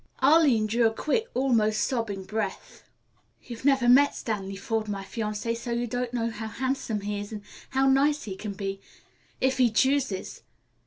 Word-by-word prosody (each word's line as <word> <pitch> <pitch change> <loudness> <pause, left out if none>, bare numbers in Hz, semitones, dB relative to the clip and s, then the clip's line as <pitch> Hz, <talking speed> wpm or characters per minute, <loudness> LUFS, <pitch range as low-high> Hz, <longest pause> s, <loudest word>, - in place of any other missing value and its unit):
Arline 275 -6 +5
drew 230 +2 +3
a - - 0
quick, 310 - -1
almost 225 -5 +2
sobbing 225 -6 -2
breath. 200 0 -5 0.5
"You've 235 -1 -9
never 270 -3 +4
met 280 +4 +6
Stanley 195 -3 -4
Forde, 220 +2 -2
my 200 -1 -4
fiancé, 215 +2 -3
so 235 +1 -7
you 235 +1 0
don't 245 +1 -3
know 230 -2 -1
how 220 0 -6
handsome 235 -2 -2
he 205 0 -3
is 205 +1 -7
and 210 -2 -7 0.3
how 270 0 +2
nice 285 +2 +3
he 195 -3 -6
can 205 +1 -6
be 195 0 -5 0.6
if 260 0 +1
he 250 -2 +5
chooses. 260 -2 0
230 Hz, 170 wpm, -27 LUFS, 210-260 Hz, 0.6 s, met